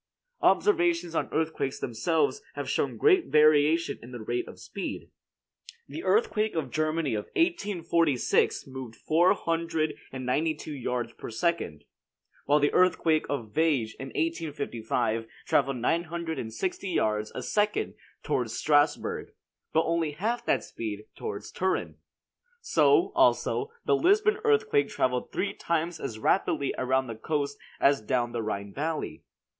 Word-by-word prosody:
Observations 345 - +3
on - - -1
earthquakes 160 -4 -1
themselves 155 - 0
have - - -4
shown - - -1
great 375 -5 +4
variation 155 0 +4
in 120 - -11
the 120 - -7
rate 120 +3 -2
of - - -11
speed. - - -6 0.8
The - - -7
earthquake 220 - +2
of 145 -6 -2
Germany 155 -2 0
of 105 -1 -2
1846 170 - +1
moved 130 -4 -8
four 170 +4 +3
hundred 165 -2 -1 0.2
and 130 -1 -6
ninety 155 +5 +1
two 150 0 -7
yards 120 -3 -3
per - - -8
second; 110 - -1 0.6
while 145 +1 +4
the 145 0 +2
earthquake 165 -3 +3
of 115 -7 -3
Viege 145 -9 +1
in 135 - -5
1855 135 -8 -2 0.2
traveled 135 -1 +2
nine 165 +8 +1
hundred 170 -1 -4
and 110 - -5
sixty 185 - -3
yards 105 -10 0
a - - -4
second 210 0 0 0.3
toward 125 -6 0
Strasburg, 145 +5 +1 0.4
but 160 - +3
only 165 -2 0
half 225 +10 -2
that - - +2
speed 105 -2 -5
towards 100 - -6
Turin. 185 0 -1 0.6
So, 425 -5 +3
also, 425 - +2 0.2
the - - +4
Lisbon 415 +3 +3
earthquake 440 -1 +3
traveled 125 -1 -1
three 200 - -1
times 170 0 -2
as 115 -5 -5
rapidly 140 - +1
around 130 +1 +1
the 115 - -5
coast 140 +5 -2 0.2
as 140 -2 +4
down 120 +2 0
the 120 -1 -2
Rhine 100 -2 -4
valley. 155 +2 -3
155 Hz, 140 wpm, -28 LUFS, 125-175 Hz, 0.8 s, great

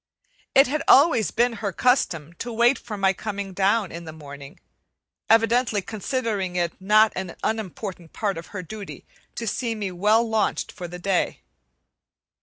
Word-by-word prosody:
It 270 - +8
had 295 +3 -1
always 275 -7 +6
been 240 +1 +1
her 200 -2 -1
custom 170 - +1
to 240 - -4
wait 235 +3 +3
for 215 -3 -7
my 195 -1 +3
coming 200 -1 -5
down 195 +1 +1
in 170 0 -8
the 160 - -7
morning, 140 -2 -11 0.7
evidently 225 0 +3
considering 215 -4 -2
it 175 -2 0
a - - -17
not 215 +2 +5 0.3
unimportant 195 -5 -4
part 205 -3 -2
of 165 - -8
her 185 -3 -6
duty 205 +3 -9 0.3
to 235 - -4
see 230 +1 -2
me 205 -3 -3
well 210 +6 +3
launched 220 -2 0
for 175 - -7
the 175 +1 -8
day. 185 0 -1
210 Hz, 160 wpm, -24 LUFS, 180-230 Hz, 0.7 s, It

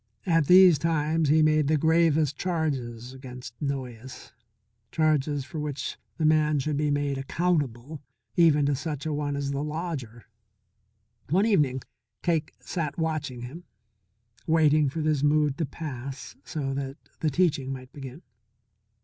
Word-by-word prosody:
At 165 -5 +2
these 180 -4 +8
times 160 -1 +1
he 155 +1 +5
made 155 -1 +3
the 155 +1 +3
gravest 160 -2 +3
charges 135 -9 -3
against 125 -2 -9
Noyes; 130 -3 -5 0.6
charges 150 -3 +1
for 145 +4 -6
which 145 -2 -4 0.2
the 160 - 0
man 155 -1 +3
should 145 +2 -1
be 150 +1 0
made 145 -1 0
accountable, 145 -3 -1 0.3
even 155 -4 +5
to 145 - +2
such 145 +1 -4
a 155 - -1
one 145 -1 -2
as 140 0 -2
the 140 0 -2
lodger. 150 -7 -5 1.0
One 190 +7 +3
evening 145 - +2 0.4
Cake 165 -3 0
sat 160 -5 -4
watching 155 -6 -2
him, 140 +9 -8 0.8
waiting 155 -2 +4
for 160 +4 -4
this 155 -2 +1
mood 150 -1 +3
to 160 - 0
pass 135 -3 -7
so 145 -5 -3
that 135 0 -4 0.2
the 155 - +1
teaching 145 -4 +1
might 130 -1 -8
begin. 135 +2 -9
150 Hz, 140 wpm, -27 LUFS, 135-160 Hz, 1.0 s, these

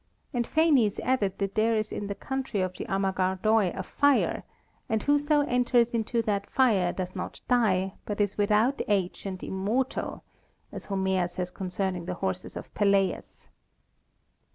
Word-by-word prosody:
And 240 -2 0
Phanes 285 -10 +3
added 215 -7 0
that 195 -1 -2
there 225 +1 +2
is 215 0 -1
in 205 - -4
the 200 - -4
country 265 -4 -3
of 185 0 -2
the - - -5
Amagardoi 190 +2 +1
a - - -2
fire; 285 -1 +2 0.5
and 220 -1 0
whoso 290 +1 +3
enters 245 -3 +2
into 230 0 0
that 200 -2 -1
fire 205 -9 +3
does 185 -1 -5
not 185 - -6
die, 195 -6 +2
but 205 -1 -3
is 205 -2 +1
"without 215 +6 +2
age 195 -1 -1
and 185 -1 -6
immortal," 215 +8 -2 0.5
as - - -8
Homer 190 -2 0
says 180 0 -5
concerning 185 -1 -3
the 180 0 -3
horses 190 0 -4
of - - -9
Peleus. 200 -2 0
205 Hz, 155 wpm, -27 LUFS, 190-240 Hz, 0.5 s, Phanes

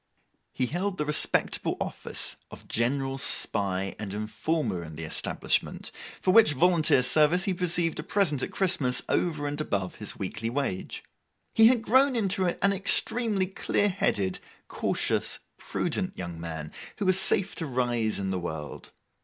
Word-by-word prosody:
He 130 - -1
held 185 +8 -3
the 150 - -1
respectable 150 0 +2
office - - -2
of - - -12
general 135 +3 -1
spy 95 -6 +1
and 100 -2 -5
informer 110 - -2
in 80 -1 -9
the 80 - -6
establishment, 80 - -1 0.3
for 185 - +2
which 215 -9 +6
volunteer 160 -3 +3
service 155 +7 +4
he 195 - 0
received 175 -2 0
a - - -1
present 160 -5 +1
at - - -2
Christmas, 175 -10 +1
over 155 -4 0
and 145 +1 -2
above 100 -10 -3
his 105 - -4
weekly 105 +4 -4
wage. 125 -7 -3 0.5
He 225 0 +7
had 240 -2 +3
grown 260 +3 +4
into 195 -4 +1
an 200 +3 +1
extremely 205 +1 +1
clear 200 +2 0
headed, 100 - 0 0.3
cautious, - - -1 0.2
prudent - - -3
young 85 -2 -6
man, 80 -2 -6 0.3
who 205 - -2
was 185 0 +4
safe 190 0 +3
to 165 - -3
rise 120 -4 0
in 95 -1 -2
the 95 - -2
world. 80 -4 -7
145 Hz, 155 wpm, -27 LUFS, -, 0.5 s, He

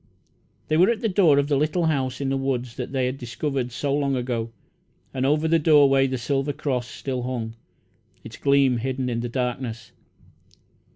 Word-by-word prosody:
They 155 - +1
were 180 +5 +5
at 235 -1 0
the 230 - +1
door 180 -8 +4
of 140 0 +2
the 145 - +1
little 155 +5 +1
house 135 -5 -1
in 140 -1 -1
the 135 - 0
woods 125 -3 -2
that 125 -1 -5
they 130 -2 0
had 130 +2 -3
discovered 125 +1 -3
so 140 +3 -2
long 140 -1 +1
ago; 120 -2 -2 0.6
and 130 0 0
over 150 +2 +2
the 165 +1 +3
doorway 140 -3 +5
the 130 0 -2
silver 135 +4 -1
cross 130 -5 -2
still 130 -1 -4
hung, 120 -3 -4 0.7
its - - -9
gleam 140 -3 +3
hidden 130 +1 -2
in 115 - -1
the 120 +1 -3
darkness. 120 -2 -3
135 Hz, 185 wpm, -24 LUFS, 125-145 Hz, 0.7 s, were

